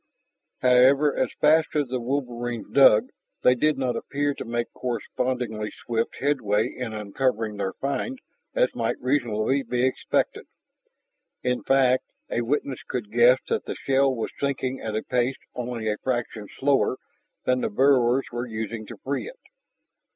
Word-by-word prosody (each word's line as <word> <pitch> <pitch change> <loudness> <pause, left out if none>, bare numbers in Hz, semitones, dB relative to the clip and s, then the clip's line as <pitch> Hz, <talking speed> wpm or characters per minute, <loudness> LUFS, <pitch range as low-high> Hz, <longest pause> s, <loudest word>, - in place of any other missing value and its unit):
However, 130 +4 +5
as - - 0
fast 155 +1 +3
as 145 -4 +1
the 130 0 -1
wolverines 120 -3 -3
dug, 130 -6 +6 0.3
they 125 - +6
did 150 +3 +1
not 130 -3 -1
appear 145 +4 -1
to - - -6
make 120 0 -3
correspondingly 120 -2 -2 0.2
swift 115 -1 -1
headway 110 -7 +1
in 125 -3 -4
uncovering 110 +1 -1
their 95 -1 -2
find 190 - -3 0.4
as - - +2
might - - -1
reasonably 125 -1 +1
be 125 -1 0
expected. 130 - -1 1.0
In 125 0 0
fact, 130 -1 +3 0.3
a 120 - 0
witness 135 +1 -1
could 115 -5 -5
guess 120 +2 +6
that - - -1
the - - -4
shell 135 0 +2
was 115 - -3
sinking 135 -2 -1
at 110 -1 -3
a 110 - -1
pace 125 +1 0 0.2
only 120 -2 -4
a 105 0 0
fraction 120 -4 -3
slower 135 -2 +2 0.5
than 125 0 +2
the - - 0
burrowers 130 +1 +3
were 120 +1 -3
using 110 -1 -5
to - - -9
free 140 - -2
it. - - -14
125 Hz, 150 wpm, -25 LUFS, 115-135 Hz, 1.0 s, dug